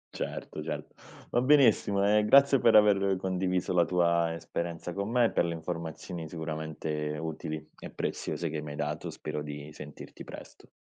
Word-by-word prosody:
Certo, - - -5
certo. - - -5 0.4
Va 120 - +2
benissimo 120 -8 +4
e 105 +1 +4
grazie 140 +3 +6
per 115 - +5
aver 100 -2 +5
condiviso 95 -1 -1
la 85 -1 +5
tua 85 -2 +2
esperienza 85 +1 -4
con 100 +3 -3
me 120 0 +4
e - - +1
per - - +2
le 85 -1 -2
informazioni 85 0 -5
sicuramente 80 -2 -4
utili 80 -1 -5
e - - -8
preziose 85 -2 -3
che 75 0 -3
mi 75 -1 -7
hai - - -6
dato, 75 +1 -3
spero 75 - -5
di 75 0 -7
sentirti 75 -1 -10
presto. - - -12
85 Hz, 165 wpm, -29 LUFS, 80-100 Hz, 0.4 s, grazie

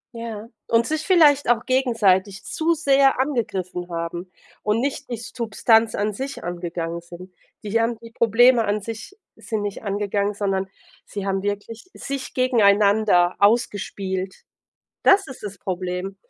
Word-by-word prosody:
Ja. 230 -2 -6 0.2
Und 230 0 +3
sich 310 +2 -3
vielleicht 295 -8 +5
auch 235 -2 +2
gegenseitig 210 -7 +1
zu 330 +1 0
sehr 275 -4 +3
angegriffen 190 -10 -2
haben 170 +2 -5 0.3
und 210 +1 0
nicht 270 0 -3
die 240 - -3
Substanz 225 -1 +1
an 210 +1 -1
sich 270 +6 -6
angegangen 170 -1 -4
sind. 175 +2 -12 0.3
Die 215 +2 0
haben 230 0 -1
die 230 0 -13
Probleme 235 +2 +4
an 205 +1 0
sich 225 - -8 0.2
sind 220 -2 -4
nicht 205 -1 -5
angegangen, 205 0 -1
sondern 195 -1 -1 0.4
sie 200 -1 -6
haben 195 -1 -1
wirklich 205 - -5
sich 275 -1 -6
gegeneinander 205 -6 +3
ausgespielt. 195 -3 0 0.6
Das 390 0 +5
ist 265 - -11
das 200 -2 -7
Problem 185 +1 -4
210 Hz, 140 wpm, -22 LUFS, 190-240 Hz, 0.6 s, vielleicht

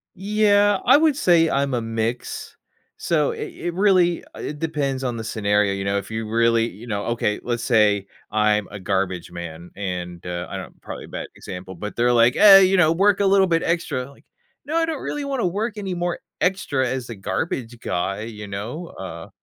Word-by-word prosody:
Yeah, 205 0 +3
I 260 +4 +7
would 310 -2 +3
say 170 - +4
I'm 140 -1 0
a 120 - 0
mix. 115 +1 -3 0.4
So, - - +1
it 440 -5 -6
it 175 - -4
really, 185 -3 +3
uh, - - -11
it 150 - -5
depends 140 -4 -2
on 120 -2 -2
the 110 - -5
scenario, 105 -2 +1
you 95 - -3
know? 100 +1 0
If 100 0 -5
you 110 0 -4
really, 115 +1 +2
you 110 +6 -12
know 105 -2 -2
Okay, 115 -3 0
let's 120 -1 -2
say 105 -4 +3 0.2
I'm 105 -1 +2
a 100 - -7
garbage 95 -2 -2
man, 85 0 -8
and, 90 -3 -5
uh, 90 -1 -4
I - - -5
know, - - -7
probably - - -8
a - - -15
bad - - -6
example, 95 0 -8
but 105 +4 -6
they're, 120 +1 +3
like, 120 +1 +4
"Eh, 200 -2 +9
you 190 +1 +4
know, 160 -3 +5
work 195 +4 +3
a 200 - +2
little 195 0 +5
bit 165 -2 +1
extra." 150 -6 -1
Like, 140 - -20 0.4
"No, 310 +3 -1
I 330 - +3
don't 320 -3 -4
really 295 -1 -3
wanna 270 -5 -1
work 210 +5 -2
anymore 175 -3 -2 0.2
extra 145 -9 +1
as 130 -1 -3
a - - -6
garbage 120 - -3
guy." 95 +2 -2
You 105 -2 -7
know? 115 - -5
Uh 85 -3 -8
120 Hz, 205 wpm, -22 LUFS, -, 0.4 s, Eh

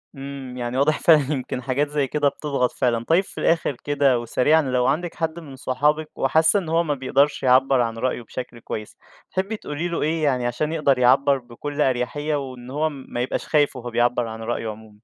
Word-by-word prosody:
إمم، 135 -2 -7
يعني 120 0 -3
واضح 150 +3 +2
فعلًا 155 -3 +4
يمكن 130 -1 -4
حاجات 135 +3 0
زي 145 -2 0
كده 145 +1 +1
بتضغط 140 -4 -1
فعلًا، 115 -3 0
طيّب 170 +7 +3
في - - -15
الآخر 165 -4 +1
كده 140 -4 +2
وسريعًا، 135 +6 +3
لو 125 -3 0
عندِك 165 +5 -1
حد 165 0 -2
من 145 -5 -11
صحابِك 150 +5 0
وحاسّة 160 +8 +3
إن 170 - -6
هو 165 +1 +2
ما 150 -3 -1
بيقدرش 140 +2 +1
يعبّر 130 0 +4
عن 115 -1 -2
رأيه 125 +1 -1
بشكل 120 +1 -8
كويس، 105 -1 -7 0.3
تحبّي 195 +4 -2
تقولي 155 -1 -4
له 170 - -3
إيه 155 +1 0
يعني 130 -4 +1
عشان 150 +6 -2
يقدر 140 -5 +2
يعبّر 135 +3 +4
بكلّ 140 +4 -6
أريحية، 140 +4 0
وإن 130 -3 -6
هو 155 +3 0
ما 135 -4 -6
يبقاش 125 - -3
خايف 145 -2 +2
وهو 125 -1 -6
بيعبّر 120 0 +1
عن 110 0 -7
رأيه 115 0 -3
عمومًا؟ 105 -1 -11
135 Hz, 200 wpm, -23 LUFS, 125-150 Hz, 0.3 s, فعلًا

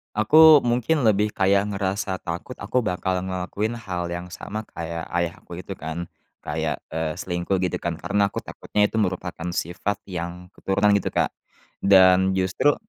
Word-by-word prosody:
Aku 155 +8 +8
mungkin 125 +2 +1
lebih 105 0 +3
kayak 100 +1 +2
ngerasa 95 -1 -2
takut, 85 +7 -6
aku 120 +5 0
bakal 90 -1 -1
ngelakuin 95 +5 -3
hal 90 -5 -4
yang 85 +1 -5
sama 105 +3 -6
kayak 85 0 -6
ayah 85 -1 -2
aku 90 +1 -9
itu, - - -9
kan. 85 -2 -5 0.4
Kayak, 80 0 -3
eee, 80 0 -2
selingkuh 90 +1 -2
gitu, 90 - -1
kan, 85 -1 -2
karena 100 +4 +1
aku - - -6
takutnya 105 - -1
itu 110 - 0
merupakan 90 -3 -2
sifat 95 +4 -3
yang 90 0 -6
keturunan, 100 +2 +1
gitu, - - -5
Kak. - - +2 0.5
Dan 95 -1 +5
justru 95 +10 +2
95 Hz, 160 wpm, -24 LUFS, 85-105 Hz, 0.5 s, Aku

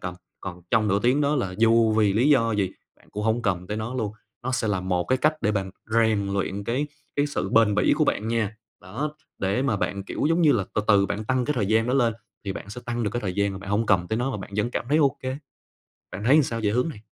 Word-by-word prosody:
cầm 90 0 -5 0.3
còn 90 -2 -7
trong 110 -2 +3
nửa 100 0 +3
tiếng 125 +4 +3
đó 145 +1 +2
là 95 -9 -2
dù 115 0 +4
vì 105 -2 +3
lý 120 +7 +3
do 115 -5 +4
gì 100 -3 0 0.3
bạn - - -25
cũng 105 - -4
hông 110 +2 +1
cầm 90 -4 -1
tới 105 - -3
nó 110 +3 -4
luôn, 110 -5 -2 0.3
nó 130 +1 -2
sẽ 115 -3 0
là 100 -3 0
một 90 -1 0
cái 130 - +2
cách 155 +4 +3
để 105 -1 +2
bạn 95 -2 -2 0.2
rèn 110 -3 +2
luyện 100 0 -2
cái 125 +7 -1 0.3
cái 145 0 +2
sự 140 -9 -2
bền 105 -1 +4
bỉ 105 - +3
của - - +3
bạn 110 - -1
nha. 110 -2 -1 0.2
Đó, 140 +12 -4 0.2
để 100 +7 0
mà 135 -7 +1
bạn, 100 0 -2
kiểu - - -2
giống 165 +2 +2
như 150 -3 +6
là, 105 -7 +1
từ 105 - +1
từ 100 -2 +5
bạn 105 +2 -3
tăng 130 +1 +1
cái 150 - -1
thời 110 -7 0
gian 110 +2 +2
đó 125 - +1
lên 120 -5 +2 0.3
thì 100 - -2
bạn 100 - -8
sẽ 125 - -7
tăng 120 0 -2
được 105 - 0
cái 120 - -2
thời 95 -5 -3
gian 100 0 +1
mà 95 - -6
bạn 95 0 -8
hông 105 +2 +1
cầm 90 -4 +3
tới 110 - 0
nó 125 +3 0
và 130 - -3
bạn 95 - -8
vẫn 110 +3 0
cảm 120 - -3
thấy 150 +2 +3
OK, 140 -4 +2 0.9
bạn 100 - -6
thấy, 130 +5 +6
ờ, - - +6
sao 115 -3 -3
về 105 - +3
hướng 125 +9 +1
này? 120 -9 -9
110 Hz, 285 wpm, -25 LUFS, 100-125 Hz, 0.9 s, như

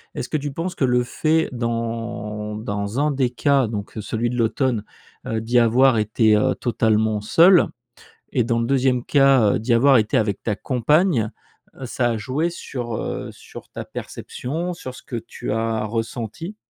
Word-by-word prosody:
est-ce 125 - -4
que 155 - 0
tu 145 0 -4
penses 170 +5 -4
que 135 - +1
le 125 -1 +2
fait, 160 +5 +1
dans 115 -3 -3
dans 100 +2 -3
un 150 +1 +2
des 135 -3 +1
cas, 135 +1 +2
donc, 105 0 -6
heu, - - -2
celui 115 +3 -2
de 125 - -3
l'automne, 115 0 0 0.4
heu, 110 0 -1
d'y 120 +2 +2
avoir 120 +2 +4
été, 110 +1 +3
heu, 105 - +2
totalement 110 -3 +1
seul, 170 - +5 0.6
et 125 - +2
dans 115 0 0
le 115 - 0
deuxième 130 -2 +2
cas, 135 -7 +4
heu, - - -1
d'y 115 +3 0
avoir 135 +3 +5
été 110 -2 +2
avec 105 -3 -1
ta 105 - -1
compagne, 130 - +1 0.5
heu, - - -4
ça 120 0 0
a 115 - -1
joué 135 +10 -1
sur, 120 -8 -5
heu, - - -4
sur - - -13
ta - - -6
perception, 165 +8 -5
sur 130 -7 -8
ce - - -13
que 120 - -5
tu 110 - -6
as 115 0 -1
ressenti? 115 - -4
120 Hz, 185 wpm, -22 LUFS, 110-135 Hz, 0.6 s, seul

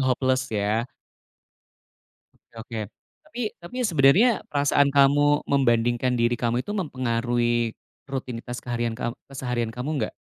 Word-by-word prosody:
hopeless 130 0 +1
ya? 110 +3 -1 1.5
Oke - - -37
oke, 115 0 -6 0.5
tapi 275 -6 -7 0.2
tapi 175 +8 -12
sebenarnya 170 - +5 0.2
perasaan 145 -1 +3
kamu 145 +1 +4
membandingkan 120 -2 +2
diri 120 +1 +2
kamu 120 +1 0
itu 205 - -5
mempengaruhi 120 - 0 0.4
rutinitas 125 -2 -5
keharian 120 -1 -2
kam 120 -1 -2 0.2
keseharian 125 -4 -2
kamu 125 +5 -4
enggak? - - -2
125 Hz, 115 wpm, -25 LUFS, 120-140 Hz, 1.5 s, sebenarnya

